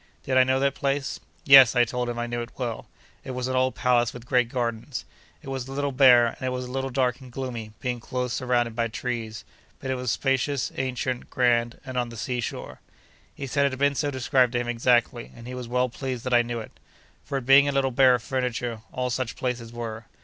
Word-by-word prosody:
Did 130 Hz, -, -1 dB
I 130 Hz, -, +7 dB
know 130 Hz, +1 st, +1 dB
that 140 Hz, 0 st, +2 dB
place? 140 Hz, 0 st, -2 dB, 0.3 s
Yes; 135 Hz, -3 st, +9 dB
I 120 Hz, 0 st, +5 dB
told 125 Hz, +1 st, -3 dB
him 120 Hz, -, -4 dB
I 120 Hz, -, -1 dB
knew 120 Hz, 0 st, -3 dB
it 120 Hz, -, -9 dB
well. 120 Hz, -3 st, -4 dB, 0.4 s
It 130 Hz, -, -6 dB
was 125 Hz, 0 st, -2 dB
an 130 Hz, -, -2 dB
old 130 Hz, 0 st, +1 dB
palace 120 Hz, -2 st, +2 dB
with 120 Hz, -1 st, -10 dB
great 125 Hz, -1 st, +2 dB
gardens. 120 Hz, 0 st, -3 dB, 0.4 s
It 135 Hz, -, -8 dB
was 130 Hz, -2 st, -4 dB
a 135 Hz, -, -7 dB
little 145 Hz, 0 st, -1 dB
bare, 125 Hz, -3 st, +7 dB
and 115 Hz, -, -5 dB
it 130 Hz, -, -1 dB
was 125 Hz, 0 st, -3 dB
a 125 Hz, -, -8 dB
little 135 Hz, +1 st, -2 dB
dark 125 Hz, -1 st, 0 dB
and 130 Hz, -1 st, -12 dB
gloomy, 120 Hz, -4 st, -5 dB
being 125 Hz, -2 st, -3 dB
close 125 Hz, +1 st, -3 dB
surrounded 120 Hz, -3 st, 0 dB
by 115 Hz, 0 st, 0 dB
trees; 115 Hz, -1 st, -5 dB, 0.3 s
but 130 Hz, -, -4 dB
it -, -, 0 dB
was 125 Hz, -1 st, -3 dB
spacious, 135 Hz, +5 st, 0 dB
ancient, 130 Hz, -1 st, -3 dB
grand, 120 Hz, -2 st, +1 dB
and 130 Hz, -1 st, -6 dB
on 120 Hz, -1 st, 0 dB
the 115 Hz, -, -10 dB
seashore. 120 Hz, +1 st, -4 dB, 0.5 s
He 140 Hz, -, -5 dB
said 140 Hz, +1 st, +2 dB
it 140 Hz, -, -3 dB
had -, -, -4 dB
been 140 Hz, +1 st, +2 dB
so 145 Hz, +1 st, -1 dB
described 130 Hz, -2 st, +2 dB
to 120 Hz, -, +1 dB
him 120 Hz, -, -3 dB
exactly, 120 Hz, 0 st, +1 dB
and 115 Hz, -, -12 dB
he 125 Hz, -, -7 dB
was 125 Hz, -1 st, -6 dB
well 125 Hz, +1 st, +1 dB
pleased 125 Hz, -1 st, -5 dB
that 130 Hz, -, -2 dB
I 120 Hz, -, +6 dB
knew 120 Hz, 0 st, -4 dB
it. 110 Hz, -, -9 dB, 0.5 s
For 140 Hz, -, -3 dB
its 130 Hz, -, -5 dB
being 135 Hz, +2 st, +7 dB
a -, -, +2 dB
little 135 Hz, -1 st, +1 dB
bare 130 Hz, 0 st, +5 dB
of 120 Hz, -, -5 dB
furniture, 125 Hz, -3 st, -2 dB
all 125 Hz, 0 st, -2 dB
such 125 Hz, -1 st, -2 dB
places 120 Hz, -3 st, -3 dB
were. 115 Hz, -2 st, -6 dB
125 Hz, 235 wpm, -25 LUFS, 120-130 Hz, 0.5 s, Yes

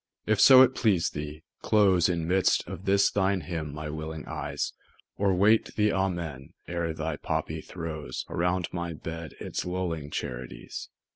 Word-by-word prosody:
if 105 Hz, -2 st, +2 dB
so 130 Hz, +2 st, +10 dB
it 130 Hz, -, +3 dB
please 100 Hz, -10 st, +2 dB
thee, 75 Hz, +1 st, -6 dB, 0.2 s
close 95 Hz, -5 st, +4 dB
In 85 Hz, -2 st, -1 dB
midst 95 Hz, +2 st, +2 dB
of 95 Hz, -, -7 dB
this 100 Hz, 0 st, +4 dB
thine 95 Hz, -1 st, +1 dB
hymn 80 Hz, -2 st, -4 dB
my 75 Hz, +1 st, -6 dB
willing 80 Hz, +1 st, -5 dB
eyes, 75 Hz, -2 st, -3 dB, 0.4 s
Or 100 Hz, -2 st, +2 dB
wait 105 Hz, +4 st, +3 dB
the 105 Hz, 0 st, +2 dB
"Amen," 85 Hz, -8 st, -2 dB
ere 85 Hz, -1 st, -2 dB
thy 80 Hz, -1 st, -3 dB
poppy -, -, -2 dB
throws 80 Hz, -4 st, -6 dB
Around 90 Hz, +1 st, 0 dB
my 85 Hz, -1 st, -3 dB
bed 80 Hz, -1 st, -7 dB
its -, -, -3 dB
lulling 90 Hz, -5 st, -3 dB
charities. 60 Hz, -4 st, -6 dB
85 Hz, 155 wpm, -28 LUFS, 80-95 Hz, 0.4 s, so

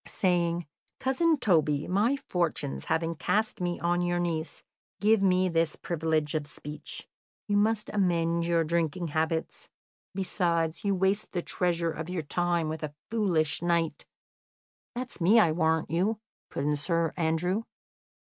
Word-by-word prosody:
"Saying, 175 Hz, -2 st, +1 dB, 0.3 s
'Cousin 310 Hz, +5 st, +2 dB
Toby, 155 Hz, -, +2 dB
my 215 Hz, +9 st, +2 dB
fortunes 160 Hz, -, -2 dB
having 165 Hz, +1 st, 0 dB
cast 215 Hz, +5 st, 0 dB
me 175 Hz, -1 st, -1 dB
on 175 Hz, +1 st, +1 dB
your 175 Hz, 0 st, 0 dB
niece, 165 Hz, -2 st, -2 dB, 0.4 s
give 215 Hz, 0 st, +4 dB
me 185 Hz, -1 st, +3 dB
this 165 Hz, -3 st, +1 dB
privilege 160 Hz, -3 st, -1 dB
of 150 Hz, -2 st, -2 dB
speech. 150 Hz, 0 st, -7 dB, 0.4 s
You 205 Hz, -1 st, +2 dB
must 210 Hz, +1 st, +2 dB
amend 170 Hz, -4 st, +1 dB
your 170 Hz, -1 st, +3 dB
drinking 170 Hz, +1 st, -1 dB
habits. 160 Hz, +2 st, -2 dB, 0.5 s
Besides, 170 Hz, -4 st, 0 dB
you 200 Hz, -1 st, +1 dB
waste 195 Hz, +3 st, 0 dB
the 175 Hz, -2 st, -1 dB
treasure 170 Hz, -2 st, 0 dB
of 160 Hz, +2 st, -6 dB
your 180 Hz, -3 st, -2 dB
time 175 Hz, +1 st, 0 dB
with 155 Hz, 0 st, -4 dB
a 150 Hz, -1 st, -5 dB, 0.2 s
foolish 165 Hz, -9 st, +1 dB
knight 170 Hz, -3 st, 0 dB, 0.4 s
'" -, -, -79 dB
"That's 245 Hz, -5 st, -5 dB
me, 205 Hz, +7 st, +6 dB
I 175 Hz, -7 st, +5 dB
warrant 160 Hz, -1 st, +1 dB
you," 190 Hz, +7 st, +1 dB, 0.3 s
put -, -, -3 dB
in 150 Hz, +1 st, +1 dB
Sir 165 Hz, +2 st, 0 dB
Andrew. 175 Hz, +4 st, 0 dB
170 Hz, 145 wpm, -28 LUFS, 160-185 Hz, 0.5 s, me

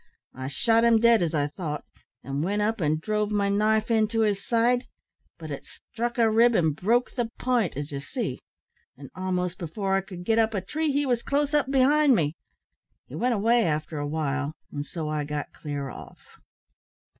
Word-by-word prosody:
I 130 Hz, 0 st, -6 dB
shot 225 Hz, -, +2 dB
him 230 Hz, -1 st, +5 dB
dead, 230 Hz, -2 st, +5 dB
as 165 Hz, -2 st, 0 dB
I 145 Hz, -1 st, +2 dB
thought, 150 Hz, -2 st, -5 dB, 0.4 s
and 140 Hz, +3 st, -3 dB
went 205 Hz, +4 st, 0 dB
up 220 Hz, -1 st, -1 dB
and 155 Hz, 0 st, +1 dB
drove 210 Hz, +4 st, -1 dB
my 205 Hz, -1 st, +1 dB
knife 215 Hz, +2 st, +2 dB
into 225 Hz, 0 st, +2 dB
his 205 Hz, -2 st, +1 dB
side, 240 Hz, +2 st, +2 dB, 0.5 s
but -, -, -8 dB
it -, -, -7 dB
struck 235 Hz, +1 st, -5 dB
a 230 Hz, -1 st, +4 dB
rib 230 Hz, +2 st, +4 dB
and 160 Hz, -6 st, +2 dB
broke 235 Hz, +9 st, +1 dB
the 240 Hz, -3 st, -2 dB
pint, 245 Hz, -, 0 dB
as 145 Hz, +1 st, -5 dB
ye 140 Hz, -, -3 dB
see; 135 Hz, -4 st, -4 dB, 0.6 s
and 135 Hz, 0 st, -11 dB
a'most 185 Hz, -1 st, -2 dB
afore 190 Hz, +4 st, -2 dB
I -, -, 0 dB
could 185 Hz, -2 st, -9 dB
get 225 Hz, +2 st, +3 dB
up 225 Hz, -1 st, +2 dB
a 195 Hz, -, 0 dB
tree, 305 Hz, -, -1 dB
he 285 Hz, +1 st, +1 dB
wos 245 Hz, -3 st, +1 dB
close 290 Hz, +2 st, 0 dB
up 295 Hz, -3 st, +2 dB
behind 275 Hz, +1 st, +4 dB
me. 150 Hz, -5 st, +1 dB, 0.7 s
He -, -, -15 dB
went 245 Hz, 0 st, +1 dB
away 230 Hz, +3 st, +3 dB
after 155 Hz, -1 st, -2 dB
a 145 Hz, -, -2 dB
while, 145 Hz, -1 st, -2 dB, 0.2 s
and 145 Hz, -, -4 dB
so 155 Hz, +1 st, -5 dB
I 150 Hz, -1 st, -1 dB
got 145 Hz, 0 st, -5 dB
clear 145 Hz, -2 st, -5 dB
off." -, -, -13 dB
205 Hz, 195 wpm, -26 LUFS, 155-235 Hz, 0.7 s, him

